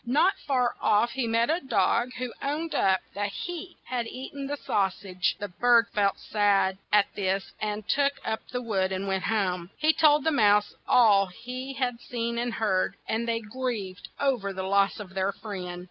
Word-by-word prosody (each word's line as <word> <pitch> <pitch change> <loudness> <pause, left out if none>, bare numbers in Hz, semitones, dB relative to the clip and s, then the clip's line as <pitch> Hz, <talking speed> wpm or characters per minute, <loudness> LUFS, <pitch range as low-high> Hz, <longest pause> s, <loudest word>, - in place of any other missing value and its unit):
Not 300 +10 +3
far 250 -3 +2
off 215 +3 +3
he 260 -2 -2
met 230 +4 +2
a 330 - +1
dog 245 -2 +1
who 250 -2 -4
owned 310 +4 -2
up 190 -1 +3
that 205 +1 -2
he 350 - -6
had 240 -2 -3
eat 255 +3 -7
en 280 -1 -5
the 290 +1 -3
sau 200 -7 +1
sage, 185 -1 -2
The 205 - -4
bird 230 +4 +3
felt 200 -1 +2
sad 200 -2 +1
at 210 -1 +3
this 195 -1 -1
and 210 0 -3
took 280 0 +2
up 220 0 -2
the 250 0 -3
wood 195 -4 0
and 190 +1 -3
went 190 -1 -1
home. 185 -5 0
He 310 +1 +3
told 300 -2 +4
the 320 - +2
mouse 210 -6 +3
all 205 -5 +5
he 255 +8 -7
had 245 -3 -1
seen 235 -1 -3
and 240 -1 -2
heard, 190 -4 0
and 230 +1 -1
they 230 0 0
grieved 215 -5 -4
o 275 -2 +2
ver 200 -2 -5
the 190 0 -4
loss 200 +2 +2
of 195 -3 -9
their 190 +1 0
friend. 185 -4 -6
220 Hz, 195 wpm, -27 LUFS, 195-255 Hz, -, all